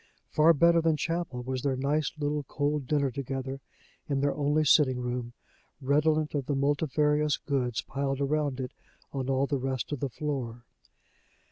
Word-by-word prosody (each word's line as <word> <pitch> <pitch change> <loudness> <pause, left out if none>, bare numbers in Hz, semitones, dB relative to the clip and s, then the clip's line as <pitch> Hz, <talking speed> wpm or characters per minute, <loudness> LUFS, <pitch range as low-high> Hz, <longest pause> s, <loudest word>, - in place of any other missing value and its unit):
Far 160 +2 +5
better 170 +3 +5
than 160 -1 +2
chapel 165 -7 -2
was 130 0 -3
their 135 -1 0
nice 145 +3 0
little 150 0 -1
cold 145 0 -1
dinner 140 -2 +1
together, 135 +1 -4 0.5
in 140 -1 +1
their 140 +1 +1
only 150 +2 +1
sitting 135 -4 +4
room, 125 -1 -3 0.5
redolent 150 +2 +2
of 140 -3 -2
the 145 - 0
multifarious 150 +1 +2
goods 125 -5 -1
piled 135 0 -2
around 145 -1 0
it 125 -1 -4 0.4
on 135 -1 -2
all 135 +1 +2
the 140 -1 -1
rest 130 -1 -3
of 145 - -2
the 140 - -2
floor. 125 -3 -4
140 Hz, 160 wpm, -29 LUFS, 130-150 Hz, 0.5 s, Far